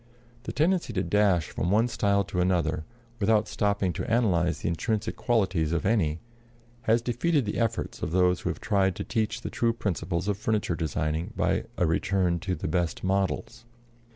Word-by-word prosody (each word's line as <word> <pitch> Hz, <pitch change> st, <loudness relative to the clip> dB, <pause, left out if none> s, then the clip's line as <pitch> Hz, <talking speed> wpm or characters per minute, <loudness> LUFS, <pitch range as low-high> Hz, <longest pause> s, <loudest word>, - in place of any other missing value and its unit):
The -, -, -3 dB
tendency 165 Hz, -2 st, +1 dB
to 95 Hz, -2 st, 0 dB
dash 100 Hz, -6 st, +2 dB
from 85 Hz, -, -2 dB
one 110 Hz, +5 st, +3 dB
style 100 Hz, -4 st, +1 dB
to 90 Hz, -1 st, -2 dB
another, 85 Hz, -4 st, +1 dB, 0.3 s
without 105 Hz, 0 st, +3 dB
stopping 100 Hz, -3 st, 0 dB
to 115 Hz, -, -4 dB
analyze 90 Hz, -8 st, +2 dB
the -, -, -2 dB
intrinsic 110 Hz, +6 st, -1 dB
qualities 95 Hz, -9 st, +1 dB
of 85 Hz, -, -1 dB
any, 85 Hz, -7 st, +1 dB, 0.7 s
has 115 Hz, +1 st, +4 dB
defeated 130 Hz, +4 st, +1 dB
the 105 Hz, -, -2 dB
efforts 115 Hz, -2 st, -2 dB
of -, -, -2 dB
those 90 Hz, +1 st, +3 dB
who -, -, -2 dB
have -, -, -4 dB
tried 100 Hz, -4 st, +1 dB
to -, -, -4 dB
teach 115 Hz, 0 st, -1 dB
the -, -, -5 dB
true 115 Hz, -1 st, +1 dB
principles 90 Hz, -4 st, -2 dB
of 100 Hz, -1 st, -1 dB
furniture 105 Hz, -6 st, 0 dB
designing 80 Hz, 0 st, -2 dB
by -, -, +1 dB
a 90 Hz, -, +2 dB
return 85 Hz, +1 st, +1 dB
to 95 Hz, 0 st, -2 dB
the -, -, -4 dB
best 85 Hz, +1 st, -1 dB
models. 100 Hz, +5 st, -1 dB
100 Hz, 180 wpm, -27 LUFS, 85-110 Hz, 0.7 s, has